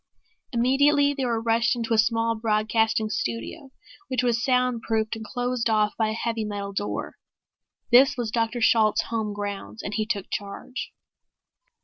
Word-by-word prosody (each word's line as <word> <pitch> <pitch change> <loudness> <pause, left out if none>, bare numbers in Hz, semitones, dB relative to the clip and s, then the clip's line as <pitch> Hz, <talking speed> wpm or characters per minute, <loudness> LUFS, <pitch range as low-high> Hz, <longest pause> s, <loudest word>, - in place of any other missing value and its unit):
Immediately 285 +4 +3
they 275 -2 -2
were 230 -1 -2
ushered 230 +2 +2
into 230 -1 -1
a 220 - +3
small 230 0 +2
broadcasting 220 0 +1
studio 120 - -4 0.4
which 255 -1 -1
was 240 -1 +1
soundproofed 235 -4 0
and 220 - -7
closed 245 +1 -2
off 215 -1 +2
by 220 -1 +1
a - - -2
heavy 230 0 -2
metal 200 -1 -4
door. 205 +1 -4 0.7
This 255 +2 +6
was 235 -3 -2
Dr. 230 +1 -1
Shalt's 220 -2 +4
home 220 -2 -1
grounds 205 +1 -6
and 205 - -4
he 215 0 -1
took 200 -4 -3
charge. 205 +5 -5
225 Hz, 150 wpm, -25 LUFS, 215-245 Hz, 0.7 s, This